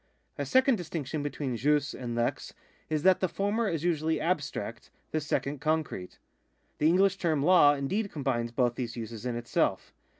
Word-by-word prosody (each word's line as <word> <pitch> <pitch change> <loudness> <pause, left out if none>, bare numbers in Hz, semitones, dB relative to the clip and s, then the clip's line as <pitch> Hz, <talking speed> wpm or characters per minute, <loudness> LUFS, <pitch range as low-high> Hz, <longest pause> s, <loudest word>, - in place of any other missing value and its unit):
A - - -2
second 260 -1 +4
distinction 155 -4 -4
between 145 -3 -3
jus 145 +3 +1
and 120 -2 -5
lex 120 0 -2 0.3
is 155 -1 -1
that 190 -1 +5
the 185 - +1
former 205 +4 0
is 165 -2 -2
usually 160 -2 +1
abstract, 165 -3 -3 0.2
the 155 - 0
second 145 -1 -2
concrete.^ 155 - -2 0.6
The 150 - +4
English 190 +3 +4
term 155 -5 +1
law 150 -4 +6
indeed 195 +10 -2
combines 125 -5 -1
both 120 0 +1
these 120 -1 -5
uses 115 +1 -6
in 120 - -2
itself. 120 0 -1
150 Hz, 165 wpm, -29 LUFS, 125-175 Hz, 0.6 s, law